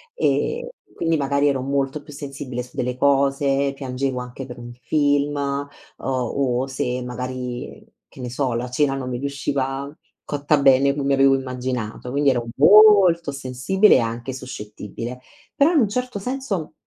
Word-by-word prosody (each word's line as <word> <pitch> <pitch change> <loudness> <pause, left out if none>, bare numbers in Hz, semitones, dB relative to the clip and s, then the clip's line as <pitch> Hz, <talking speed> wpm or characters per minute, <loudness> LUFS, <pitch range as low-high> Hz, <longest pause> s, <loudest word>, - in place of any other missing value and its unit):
ehm, 485 0 0 0.3
quindi 165 -1 +1
magari 140 +1 +1
ero 135 -2 +1
molto 140 +2 -1
più 150 0 -13
sensibile 135 -3 -6
su 125 - -17
delle 125 0 -2
cose, 140 0 +2
piangevo 130 -1 -3
anche 125 +1 -8
per 125 - -9
un 120 0 -9
film, 145 -1 +1
uhm, 140 0 -2 0.3
o 130 0 -1
se 125 -1 -2
magari, 125 0 -6 0.2
che 130 - -13
ne 125 - -4
so, 130 -1 -1
la 120 +1 -3
cena 135 +1 +1
non 130 -2 -4
mi 120 -1 -3
riusciva 140 0 -2 0.4
cotta 145 0 +1
bene 140 +1 +5
come 140 -1 0
avevo 135 0 +5
immaginato. 125 -3 -4
Quindi, 140 0 +3
ero 120 -2 -2
molto 190 -3 +6
sensibile 140 +10 +3
e - - +5
anche 115 +3 -3
suscettibile, 120 -1 -7 0.4
però 305 +5 +4
in 300 - +4
un 210 - +2
certo 250 0 -3
senso, 245 - -3
135 Hz, 155 wpm, -22 LUFS, 125-145 Hz, 0.4 s, molto